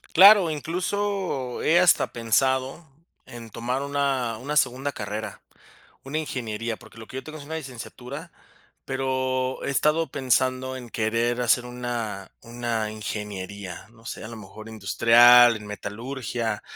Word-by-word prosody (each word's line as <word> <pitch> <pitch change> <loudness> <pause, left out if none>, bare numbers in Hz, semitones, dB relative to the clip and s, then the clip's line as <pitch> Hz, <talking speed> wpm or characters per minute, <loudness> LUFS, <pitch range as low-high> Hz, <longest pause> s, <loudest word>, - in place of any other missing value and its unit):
Claro, 195 -1 +8
incluso 180 -3 -2
he 170 +2 +5
hasta 180 -2 +4
pensado 130 +6 0 0.4
en 115 -1 -10
tomar 125 +4 -3
una 140 -5 -1
una 145 +5 -2
segunda 135 +1 +1
carrera, 105 -1 -5 0.6
una 140 +3 -4
ingeniería, 115 -6 -3
porque 110 0 -17
lo 110 - -10
que - - -11
yo - - -5
tengo 155 0 -9
es 140 - -10
una 160 +2 -5
licenciatura, 135 +2 -8 0.5
pero 130 -1 -1
he - - -2
estado 150 +4 +2
pensando 130 0 0
en 125 -2 -10
querer 115 +2 0
hacer 120 +1 +3
una 120 -5 -4
una 115 -2 -3
ingeniería, 100 -3 -6
no 115 -1 -20
sé, - - -6
a - - -6
lo 115 - -8
mejor 110 +1 -11
industrial, 115 +3 +6
en 105 - -11
metalurgia, 115 +1 -4
125 Hz, 140 wpm, -25 LUFS, 115-140 Hz, 0.6 s, Claro